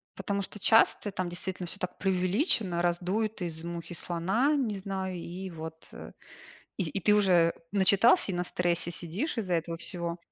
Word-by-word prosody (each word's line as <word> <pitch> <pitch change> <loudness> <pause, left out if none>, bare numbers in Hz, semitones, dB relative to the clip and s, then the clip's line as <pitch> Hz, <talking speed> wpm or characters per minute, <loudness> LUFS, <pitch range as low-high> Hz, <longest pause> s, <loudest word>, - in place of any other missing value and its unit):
потому 200 0 -2
что 210 - -6
часто 220 -1 +4
там 185 -2 -3
действительно 180 +1 -5
всё 170 - -6
так 180 - -4
преувеличено, 190 - +1
раздуют 185 +5 -1
из 165 -2 -3
мухи 170 0 -6
слона, 190 - 0
не 245 -8 0
знаю, 190 -1 -4
и 180 +2 -6
вот, 160 -1 -8
э, - - -9 0.7
и 190 - 0
и 195 - -3
ты 210 +3 +4
уже 180 -5 +4 0.2
начитался 200 - +4
и - - -3
на 175 - 0
стрессе 175 -1 0
сидишь 190 - -3
из-за 190 -5 -1
этого 165 0 -2
всего. 170 0 -4
185 Hz, 170 wpm, -29 LUFS, 170-200 Hz, 0.7 s, часто